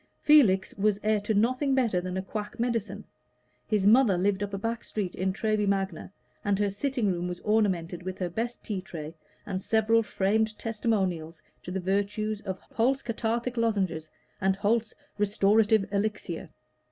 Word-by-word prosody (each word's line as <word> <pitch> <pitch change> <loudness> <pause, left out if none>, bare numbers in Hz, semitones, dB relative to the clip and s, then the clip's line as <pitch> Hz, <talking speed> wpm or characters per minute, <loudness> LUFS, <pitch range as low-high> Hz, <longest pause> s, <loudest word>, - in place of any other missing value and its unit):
Felix 215 -12 +5
was 205 0 +2
heir 215 0 +2
to 210 +1 -1
nothing 255 +6 +2
better 230 -9 +2
than 185 +1 -4
a 190 - -2
quack 210 +3 -6
medicine; 230 -3 -2 0.6
his 210 -3 +1
mother 220 -3 +6
lived 190 +2 +1
up 205 -1 -2
a 195 - -3
back 230 +3 -3
street 195 -4 -3
in 190 +1 -1
Treby 215 +1 0
Magna, 195 -4 -1 0.3
and 205 -1 +1
her 205 0 +1
sitting 240 0 0
room 175 0 -2
was 180 0 -5
ornamented 190 -6 +1
with 185 +1 -5
her 180 - -1
best 230 +7 -4
tea 200 -4 -3
tray 160 -4 -7 0.3
and 190 -2 -3
several 220 +2 +3
framed 215 +1 0
testimonials 190 -8 -2 0.2
to - - -9
the 190 +1 -2
virtues 205 +3 -1
of 190 -3 -4 0.2
Holt's 260 +4 +1
Cathartic 235 +1 -2
Lozenges 190 -9 0 0.3
and 190 0 +2
Holt's 215 +3 0 0.2
Restorative 210 +1 +3
Elixir. 200 -4 -2
205 Hz, 165 wpm, -28 LUFS, 190-225 Hz, 0.6 s, mother